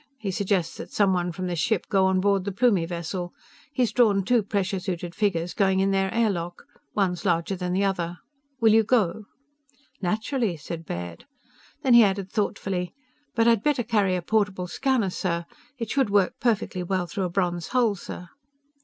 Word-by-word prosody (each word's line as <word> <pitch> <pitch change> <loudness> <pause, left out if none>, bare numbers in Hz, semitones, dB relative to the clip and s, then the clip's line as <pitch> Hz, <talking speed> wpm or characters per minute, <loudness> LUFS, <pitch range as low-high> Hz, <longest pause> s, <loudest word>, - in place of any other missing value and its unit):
He 210 -5 -3
suggests 190 -2 -1
that - - -8
someone 185 -4 +2
from 185 +2 -5
this 175 -2 -2
ship 220 +2 +1
go 195 -2 +3
on 190 0 +2
board 200 -1 +2
the 200 - -3
Plumie 200 -5 +2
vessel. 175 +1 -5 0.4
He's 250 -4 +1
drawn 210 -6 +3
two 240 +2 +3
pressure 195 -1 -1
suited 180 -2 -4
figures 180 -5 0
going 190 -2 +2
in 195 +1 +2
their 195 -1 +1
air 230 -2 +2
lock. 175 -1 -5 0.3
One's 185 -4 0
larger 175 +1 +1
than 180 -1 -3
the 190 +2 +1
other. 175 -3 -1 0.4
Will 225 -2 +5
you 225 - +6
go?" 215 -3 +1 0.8
"Naturally!" 215 - -1
said 165 +2 -7
Baird. 85 -1 -6 0.6
Then 260 - +4
he 235 -1 +9
added 195 -2 0
thoughtfully: 190 -2 -2 0.4
"But 230 0 +3
I'd 230 -3 +4
better 285 -1 +1
carry 200 -5 +1
a 180 - -3
portable 200 -3 0
scanner, 225 +2 0
sir. 170 -2 -2 0.3
It 230 -3 -4
should 270 -5 +2
work 200 -2 +3
perfectly 220 -5 0
well 180 0 -1
through 190 +2 -3
a - - -2
bronze 175 -2 -1
hull, 245 -4 +2
sir." 180 -1 -8
195 Hz, 180 wpm, -25 LUFS, 180-215 Hz, 0.8 s, he